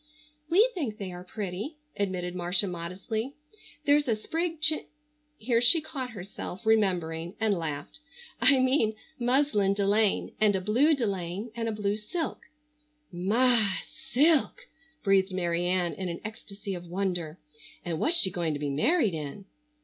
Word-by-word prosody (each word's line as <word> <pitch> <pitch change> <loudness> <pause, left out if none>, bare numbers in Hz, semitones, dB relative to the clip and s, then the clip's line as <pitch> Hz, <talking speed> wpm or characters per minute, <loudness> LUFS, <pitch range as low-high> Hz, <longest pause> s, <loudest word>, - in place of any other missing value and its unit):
"We 405 +8 +6
think 265 - -3
they 195 -2 -5
are 180 0 -8
pretty," 205 - -5 0.2
admitted 185 -3 -2
Marcia 180 +2 0
modestly. 190 +8 -4 0.5
"There's 290 0 +4
a 230 - +2
sprigged 325 +8 -3
chin—" 310 -1 +2 0.5
here 230 +1 +1
she 250 +7 +6
caught 275 -5 -5
herself, 200 0 -8
remembering, 180 -5 +1
and 220 -2 +2
laughed. 155 - -4 0.4
"I 280 - +6
mean 255 -4 +2 0.2
muslin 240 -6 +2
de 200 -1 0
laine, 205 0 +2
and 210 -2 +4
a 190 - 0
blue 255 - +4
delaine, 200 -2 -3
and 230 -1 -2
a - - -1
blue 210 -1 -1
silk——" 315 +10 -5 0.6
"My! 210 +2 +3 0.3
silk!" 300 - +3 0.4
breathed 195 -1 +3
Mary 175 -1 0
Ann 180 -1 +1
in 185 -2 -4
an 170 - -5
ecstasy 205 -2 -7
of 175 -1 -7
wonder. 175 -3 -2 0.5
"And 165 -2 -2
what's 340 +2 +4
she 190 - +5
going 170 -3 -1
to - - -4
be 145 -1 -2
married 215 - +2
in?" 155 +5 -6
205 Hz, 150 wpm, -28 LUFS, 180-245 Hz, 0.6 s, We